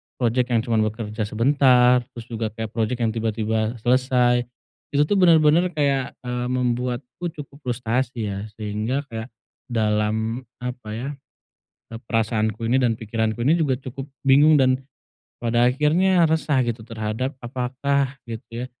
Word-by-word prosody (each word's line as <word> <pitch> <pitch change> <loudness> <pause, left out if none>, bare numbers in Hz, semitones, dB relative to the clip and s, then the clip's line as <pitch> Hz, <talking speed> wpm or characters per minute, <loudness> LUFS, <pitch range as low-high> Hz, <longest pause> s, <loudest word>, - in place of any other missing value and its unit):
project 125 0 +1
yang 115 -1 +3
cuma 115 -2 +1
bekerja 110 0 -2
sebentar 125 +1 +4 0.2
terus 120 - -7
juga 110 -1 -2
kayak 110 -1 -5
project 115 +2 -1
yang 110 - +2
tiba-tiba 110 0 -1
selesai, 125 -1 +3 0.5
itu 145 - +5
tuh 205 - +2
benar-benar 165 0 +5
kayak, 140 -3 0
eee, 125 0 -3
membuatku 125 +5 -2
cukup 140 -1 -10
frustasi 120 -2 -1
ya, 100 0 -4 0.2
sehingga 110 +6 -2
kayak 110 +1 -5 0.4
dalam 110 +1 0 0.2
apa 125 -3 -6
ya, 130 +5 -4 0.8
eee, 115 0 -7
perasaanku 110 0 0
ini 130 - +4
dan 115 -2 +2
pikiranku 110 +1 -2
ini 160 - +5
juga 140 -5 +2
cukup 135 0 -7 0.2
bingung 145 +3 +6
dan 130 0 +2 0.6
pada 120 +1 +2
akhirnya 165 +7 +3
resah 155 -4 +2
gitu 115 -1 -3
terhadap 115 +4 -3
apakah 130 +2 -1
gitu 115 +1 -6
ya, - - -5
125 Hz, 140 wpm, -23 LUFS, 110-135 Hz, 0.8 s, bingung